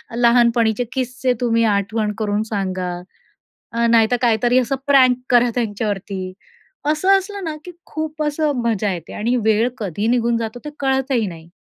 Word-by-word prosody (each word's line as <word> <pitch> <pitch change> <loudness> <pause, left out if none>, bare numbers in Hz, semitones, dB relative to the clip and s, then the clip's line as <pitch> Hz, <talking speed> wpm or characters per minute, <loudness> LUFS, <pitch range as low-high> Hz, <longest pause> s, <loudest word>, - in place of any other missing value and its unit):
लहानपणीचे 235 -1 +3
किस्से 255 0 -1
तुम्ही 230 -1 +2
आठवण 210 +2 -1
करून 210 -1 -1
सांगा. 185 -3 -2 0.8
अ, 235 0 +1
नाहीतर 230 +1 +4
काहीतरी 240 +2 +3
असं 255 +2 0
प्रँक 260 -3 +5
करा 245 -1 +4
त्यांच्यावरती. 205 -4 -3 0.6
असं 375 +6 +4
असलं 400 0 -6
ना, 310 -2 -4
की 360 - -8 0.2
खूप 310 -1 -4
असं 300 0 0
मजा 215 -3 0
येते. 170 -3 -7
आणि 235 +4 0
वेळ 220 +2 +3
कधी 205 0 -3
निघून 235 -1 +2
जातो 230 +1 -4
ते 300 - -5
कळतही 265 -4 0
नाही. 165 -2 -9
235 Hz, 150 wpm, -20 LUFS, 210-260 Hz, 0.8 s, प्रँक